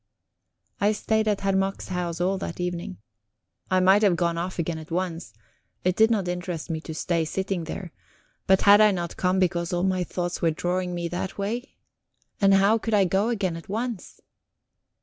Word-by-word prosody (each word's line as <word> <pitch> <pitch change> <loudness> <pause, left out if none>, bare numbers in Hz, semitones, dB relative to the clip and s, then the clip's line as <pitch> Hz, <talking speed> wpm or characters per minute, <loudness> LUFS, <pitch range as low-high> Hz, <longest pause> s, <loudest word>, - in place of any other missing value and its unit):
I 210 +1 +3
stayed 220 +1 0
at 205 -2 +1
Herr 195 -1 +1
Mack's 195 0 -1
house 175 -2 -3
all 190 +2 0
that 170 - -6
evening. 175 - -4 0.7
I 185 - +3
might 190 +3 +5
have 200 -5 +4
gone 170 -1 0
off 175 +2 -4
again 170 -1 -2
at 155 - -11
once 170 -5 -3 0.5
it 180 0 +1
did 220 0 +5
not 205 -5 0
interest 175 -2 -4
me 160 -1 -3
to 160 -1 -7
stay 165 0 0
sitting 190 +1 -2
there 175 +1 -6 0.6
but 190 0 +5
had 205 +1 +8
I 215 - +7
not 175 -4 -3
come 185 0 +1
because 175 -2 0
all 175 0 0
my 185 -1 +1
thoughts 175 0 -4
were 165 - +3
drawing 180 +2 -2
me 170 0 -2
that 175 +2 -4
way? 225 +6 -4 0.7
And 195 -1 +6
how 200 +4 +4
could 225 0 0
I 200 -2 +4
go 195 +5 +1
again 195 -7 -1
at 165 - -10
once? 225 0 -4
185 Hz, 190 wpm, -25 LUFS, 175-195 Hz, 0.7 s, had